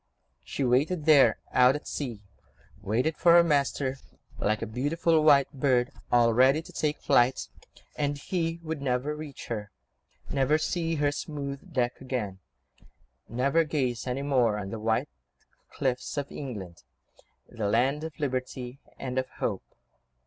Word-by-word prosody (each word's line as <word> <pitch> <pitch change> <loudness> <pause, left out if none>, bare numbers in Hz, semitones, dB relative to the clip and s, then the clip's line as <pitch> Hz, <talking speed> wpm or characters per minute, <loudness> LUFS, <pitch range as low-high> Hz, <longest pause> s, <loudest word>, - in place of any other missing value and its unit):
She 140 - -3
waited 145 +6 +1
there, 140 -8 +6
out 125 +2 +5
at 150 - -6
sea, 120 -8 -5 0.6
waited 125 +10 0
for 170 -2 +5
her 170 0 +8
master, 140 -3 0 0.4
like 110 +2 0
a - - -1
beautiful 150 +8 +1
white 140 -3 +5
bird 130 -1 +1 0.2
all 120 -1 +4
ready 135 +6 +4
to - - -14
take 150 -1 -1
flight, 120 +2 +2 0.5
and 145 -1 -1
he 165 +2 -2
would 160 -3 -4
never 135 +2 -1
reach 150 -3 -8
her, 105 -3 -4 0.6
never 140 +2 +2
see 165 +1 -1
her 145 -1 +1
smooth 140 -1 -6
deck 125 -1 0
again, 115 -8 -4 0.9
never 140 +7 +2
gaze 130 -6 -2
any 130 +2 -2
more 125 -6 +2
on 100 -2 -5
the 115 - -5
white 110 +1 0 0.6
cliffs 130 +1 -2
of 140 -1 -3
England, 100 -11 -7 0.7
the 110 -3 -3
land 130 +7 +2
of 160 0 -7
liberty 130 -2 -3 0.2
and 130 -1 -2
of 130 - -3
hope. - - -2
135 Hz, 145 wpm, -28 LUFS, 120-150 Hz, 0.9 s, her